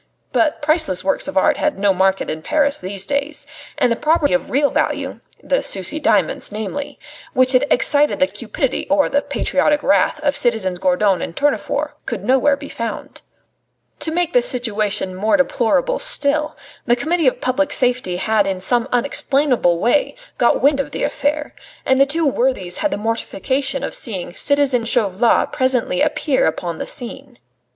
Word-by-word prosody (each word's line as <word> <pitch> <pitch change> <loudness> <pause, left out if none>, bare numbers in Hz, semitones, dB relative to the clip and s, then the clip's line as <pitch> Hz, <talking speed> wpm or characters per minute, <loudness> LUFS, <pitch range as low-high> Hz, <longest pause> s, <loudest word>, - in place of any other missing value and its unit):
But 310 -1 0
priceless 305 - +1
works 285 - -1
of 285 - -4
art 190 - +3
had - - -1
no 200 0 +2
market 190 +1 +1
in 155 0 -4
Paris 285 - +1
these 190 +1 -4
days; 285 +4 -2 0.3
and 245 - +2
the - - +2
property 305 0 +1
of 270 - -1
real 285 +2 +1
value - - -2 0.2
the - - 0
Sucy 195 - -1
diamonds 210 - +1
namely 220 +7 -5 0.4
which 255 0 +3
had 265 +2 +3
excited 290 +3 +2
the 280 - +5
cupidity 260 0 -3
or 290 0 +2
the 285 - +1
patriotic 295 0 0
wrath 290 - +2
of 285 -1 +1
citizens 205 -7 0
Gourdon 190 +1 +1
and 165 - -5
Tournefort 290 +1 -1 0.2
could - - -4
nowhere 265 +2 +2
be 285 0 -9
found. 230 -4 -6 0.8
To - - -2
make 345 +1 -1
the - - +5
situation 215 - 0
more 215 +9 +1
deplorable - - +1
still, 300 -9 +1 0.3
the 240 - +4
Committee 315 +5 0
of 255 - +1
Public 280 +3 0
Safety 250 -10 +1
had 210 +1 +1
in 190 -1 -2
some 240 +6 +1
unexplainable 255 - +1
way 245 - +1 0.2
got 240 0 +2
wind 280 0 +3
of 275 - -2
the - - -4
affair, 295 +1 -2 0.3
and 265 0 +3
the 275 - +5
two 320 +3 -1
worthies 245 -10 0
had 305 - 0
the - - -3
mortification 260 +5 -2
of - - -4
seeing 190 -7 -2
citizen 285 -4 +1
Chauvelin 225 0 +2
presently 260 0 0
appear 300 -2 +1
upon 165 +1 -3
the - - -5
scene. 255 +1 -5
260 Hz, 170 wpm, -19 LUFS, 210-290 Hz, 0.8 s, the